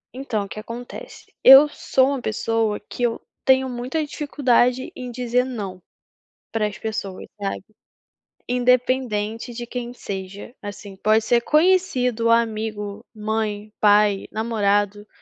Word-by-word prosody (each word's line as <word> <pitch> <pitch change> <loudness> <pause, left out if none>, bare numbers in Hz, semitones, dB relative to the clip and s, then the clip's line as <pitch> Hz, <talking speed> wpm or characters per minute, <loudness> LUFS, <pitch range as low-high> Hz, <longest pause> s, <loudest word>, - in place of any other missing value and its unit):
Então, 245 -6 -2
o - - -8
que 215 - -8
acontece? 235 +3 -9
Eu 270 +3 +10
sou 265 -2 +1
uma 275 -3 -2
pessoa 220 -1 -1
que 210 - -10
eu 235 -1 +1 0.2
tenho 265 0 +4
muita 255 +5 -3
dificuldade 260 -4 +1
em 250 -1 -6
dizer 245 0 0
"não", 205 -8 -6 0.7
para 220 -2 0
as 210 0 -8
pessoas, 215 -3 -5 0.2
sabe. 195 -2 -3 0.8
Independente 245 -3 +1
de 240 0 -6
quem 240 0 -5
seja, 195 +2 -7
assim, 205 -1 -8
pode 215 +3 +2
ser 235 +1 +3
conhecido, 270 -8 +2
amigo, 215 -3 0
mãe, 215 -1 -3
pai, 205 -1 +4
namorado, 205 -2 0
230 Hz, 125 wpm, -22 LUFS, 210-250 Hz, 0.8 s, Eu